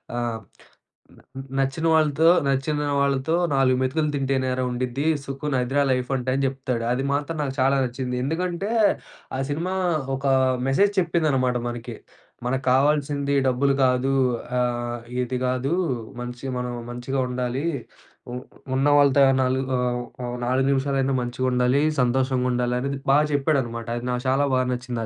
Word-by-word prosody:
ఆ! - - -2 1.0
"న్ - - -18 0.4
నచ్చిన 135 +4 -1
వాళ్ళతో, 155 +1 +4 0.2
నచ్చిన 140 +2 0 0.2
వాళ్ళతో 140 +3 +1 0.2
నాలుగు 130 -1 +3
మెతుకులు 150 +4 0
తింటేనేరా 130 -2 0
ఉండిద్ది. 125 +3 -2 0.2
సుఖున్ 135 0 -2
అదిరా 135 +3 +1
లైఫ్ 125 0 -1
అంటే" 130 +1 -2
అని 135 0 +1
చెప్తాడు. 130 -3 -3
అది 135 +2 -1
మాత్రం 150 +3 -2
నాకు 135 -1 -3
చాలా 135 +1 +3
నచ్చింది. 125 0 -4
ఎందుకంటే 180 +7 -2 0.7
ఆ - - -3
సినిమా 170 +6 -2 0.4
ఒక 135 - -6 0.4
మెసేజ్ 200 +9 +3
చెప్పిందనమాట 150 -8 +1
మనకి. 120 -1 -6 0.5
"మనకు 130 +2 -1
కావాల్సింది 140 +1 +2
డబ్బులు 135 +2 +2
కాదు. 125 +1 +1 0.5
ఆహ్, 120 -1 -1 0.2
ఇది 125 +1 -3
కాదు 130 +5 0 0.5
మంచి 125 +2 -7
మనం 125 0 -3 0.2
మంచిగా 125 +2 -2
ఉండాలి. 125 +4 -2 0.7
ఉ - - -6 0.4
ఉన్నవాళ్లతో 140 0 +4 0.2
నాలుగు 130 +1 +1 0.2
ఆహ్, 125 0 0 0.2
ఆహ్, 120 0 -4
నాలుగు 130 +1 +2
నిమిషాలైనా 135 0 +1
మంచిగా 125 +1 -2
ఉండాలి. 125 +3 +2 0.2
సంతోషంగా 130 +1 +1
ఉండాలి" 125 0 0
అనేది 140 0 -3
బాగా 150 +2 +5
చెప్పాడనమాట 130 -6 0
అది 120 - -5
నాకు 125 +1 -2
చాలా 140 +2 +2
బాగా 130 0 +1
నచ్చింది. 125 -1 -4
130 Hz, 140 wpm, -24 LUFS, 125-140 Hz, 1.0 s, బాగా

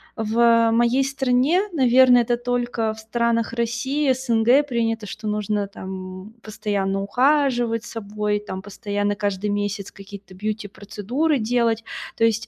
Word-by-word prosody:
в 230 +1 +3
моей 240 +3 +3
стране, 270 +5 +2
наверное, 255 -3 +5
это 240 +1 0
только 240 -2 -1
в 220 - -12
странах 230 0 -1
России, 260 +5 0
СНГ 245 +2 +3
принято, 225 -3 -1
что 215 +2 -7
нужно, 210 -1 -1
там, 190 +1 -8
постоянно 200 -2 -2
ухаживать 245 -1 +1
собой, 210 -2 -3
там, 190 -2 -7
постоянно 205 0 -3
каждый 205 0 -2
месяц 205 -1 -3
какие-то 195 -1 -12
бьюти-процедуры 215 +7 -2
делать. 230 0 +1 0.3
То 230 - 0
есть, 220 -1 +2
225 Hz, 125 wpm, -22 LUFS, 205-245 Hz, 0.3 s, наверное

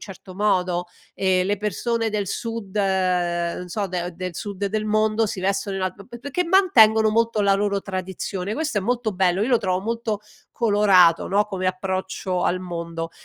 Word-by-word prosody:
certo 185 0 -13
modo, 180 -3 +1 0.3
e 185 -1 +2
le 205 +2 0
persone 225 +2 -1
del 205 -2 -2
Sud, 225 -1 -5
non 180 -3 0
so, 200 +2 -2
de 180 -1 -4
del 180 -1 -5
Sud 200 -1 -5
del 215 +1 -2
mondo, 215 +1 +2
si 190 - -4
vestono 195 +1 -1
in 190 - -3
un 185 - +1
alt 195 +2 -14
p 240 - -10
p - - -13
perché 285 +7 -2
mantengono 225 - +5
molto 230 -1 +1
la 200 0 +4
loro 200 0 0
tradizione. 190 +1 -4
Questo 300 -9 -1
è - - 0
molto 235 +1 -1
bello. 185 +1 +1
Io 235 - 0
lo 240 -3 +4
trovo 185 -2 -1
molto 225 -1 -2 0.3
colorato, 205 -7 +4
no, 205 +2 +2
come 185 -2 -3
approccio 185 0 -2
al 185 - +1
mondo. 170 -2 -5
195 Hz, 185 wpm, -23 LUFS, 185-215 Hz, 0.3 s, mantengono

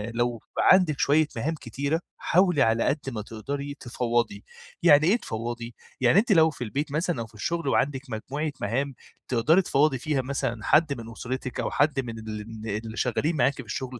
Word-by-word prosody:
لو 120 -1 0 0.2
عندِك 180 -6 +5
شوية 155 0 +3
مهام 140 +8 -1
كتيرة 140 +4 -2 0.2
حاولي 180 -4 +3
على 115 -2 +3
قد 150 - +1
ما 115 -5 -4
تقدري 140 +7 -5
تفوّضي، 120 -4 -1 0.4
يعني 155 -2 +6
إيه 205 +6 +4
تفوّضي؟ 120 - -5 0.3
يعني 130 +10 +5
أنتِ 225 +2 0
لو 160 -4 +6
في 145 - -6
البيت 140 +6 -3
مثلًا 160 -2 -1
أو - - -4
في 115 - -24
الشغل 165 +9 -3
وعندِك 135 0 +1
مجموعة 140 +7 -3
مهام، 135 +3 -1 0.3
تقدري 140 +9 +3
تفوّضي 145 -4 +2
فيها 140 +1 -1
مثلًا 130 -3 -3
حد 155 -2 +4
من 115 0 -9
أسرتِك 130 +2 -5
أو - - -1
حد 145 -1 +2
من 115 -3 -4
ال 110 0 -7 0.2
اللي 110 0 -7
شغالين 150 +6 0
معاكِ 135 +2 +3
في 135 - -8
الشغل، 125 +3 -5
135 Hz, 180 wpm, -26 LUFS, 115-155 Hz, 0.4 s, يعني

